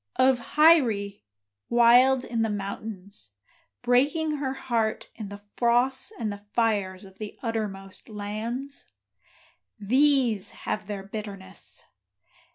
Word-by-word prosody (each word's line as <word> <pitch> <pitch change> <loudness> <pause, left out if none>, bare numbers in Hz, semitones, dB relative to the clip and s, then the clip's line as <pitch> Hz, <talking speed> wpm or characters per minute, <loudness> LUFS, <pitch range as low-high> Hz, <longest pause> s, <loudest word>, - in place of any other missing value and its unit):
of 255 -1 +2
Hyrie, 235 - +4 0.5
wild 245 +2 +5
in 230 -2 -2
the 225 - +1
mountains, 200 - -6 0.5
Breaking 295 +5 +2
her 270 -2 -2
heart 230 -5 -2
in 215 -3 -7
the 205 0 -10
frosts 250 - +2
and 215 -2 -2
the 200 - -10
fires 200 -5 0
of 190 0 -16
the 215 -1 -7
uttermost 205 -5 -4
lands? 220 +6 -5 0.9
These 250 -1 +3 0.2
have 210 -2 -2
their 205 -2 -5
bitterness. 200 -2 -6
225 Hz, 110 wpm, -26 LUFS, 200-255 Hz, 0.9 s, wild